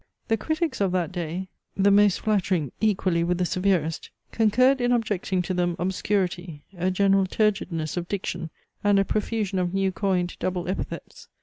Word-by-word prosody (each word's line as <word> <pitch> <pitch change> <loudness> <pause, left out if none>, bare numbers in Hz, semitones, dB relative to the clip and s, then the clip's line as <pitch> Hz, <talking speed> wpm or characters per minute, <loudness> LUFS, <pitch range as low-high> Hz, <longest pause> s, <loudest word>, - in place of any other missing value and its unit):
The 225 - +4
critics 315 - -2
of 190 -2 +1
that 180 -1 0
day, 175 +1 -4 0.3
the 200 +1 +4
most 205 -1 +4
flattering, 185 - 0
equally 185 -5 +2
with 175 +1 0
the 180 - +1
severest, 180 -4 0 0.2
concurred 255 +4 +3
in 245 0 +2
objecting 205 -6 0
to 185 - -2
them 175 -1 0
obscurity, 180 -3 -2
a 180 +1 0
general 195 0 +3
turgidness 185 -7 0
of 175 0 -3
diction, 185 -4 -3 0.3
and 205 -1 +4
a 195 - +3
profusion 210 -2 -1
of 180 +1 -1
new 195 -1 +1
coined 185 -2 -1
double 180 -1 -2
epithets. 185 - -5
190 Hz, 165 wpm, -25 LUFS, 175-205 Hz, 0.3 s, The